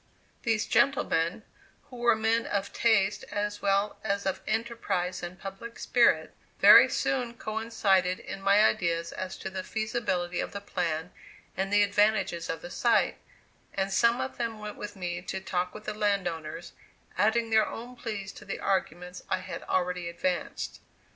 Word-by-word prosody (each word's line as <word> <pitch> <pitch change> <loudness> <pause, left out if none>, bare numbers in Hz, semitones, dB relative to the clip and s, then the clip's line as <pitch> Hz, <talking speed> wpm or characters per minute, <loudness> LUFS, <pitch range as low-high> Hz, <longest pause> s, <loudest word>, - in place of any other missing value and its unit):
These 225 -2 +1
gentlemen, 215 -9 +2 0.4
who 250 - -13
were 240 -1 +4
men 225 +1 +1
of 200 -1 -2
taste 210 -4 +2
as 205 0 -3
well 200 +1 +1
as 200 -1 -1
of 190 - -1
enterprise 220 -5 -1
and 175 +1 -7
public 195 +4 -8
spirit, 240 -1 +3 0.2
very - - +9
soon 245 -3 -1
coincided 215 -5 +1
in 195 - -7
my 200 +2 +5
ideas 170 -4 +1
as 185 0 -5
to 190 - -6
the 190 0 -4
feasibility 205 -6 -2
of - - -3
the 200 - -4
plan 175 -4 -2 0.4
and 195 +1 -2
the 205 0 +5
advantages 205 -4 +1
of 165 - -4
the 175 - -7
site; 235 +4 +2 0.6
and 195 0 -1
some 235 +4 +4
of 260 - -4
them 230 -2 -2
went 210 0 -7
with 210 0 -7
me 175 -2 -4
to 190 +1 -4
talk 180 -1 -2
with 215 - -8
the 215 - -3
land 205 -3 +1
owners, 165 0 -6 0.4
adding 225 +2 +2
their 220 -1 +4
own 245 +2 -7
pleas 210 -5 -5
to - - -12
the - - -5
arguments 180 -2 -2
I 185 - +2
had 185 - -7
already 180 -1 0
advanced. 175 0 -3
200 Hz, 165 wpm, -28 LUFS, 180-220 Hz, 0.6 s, very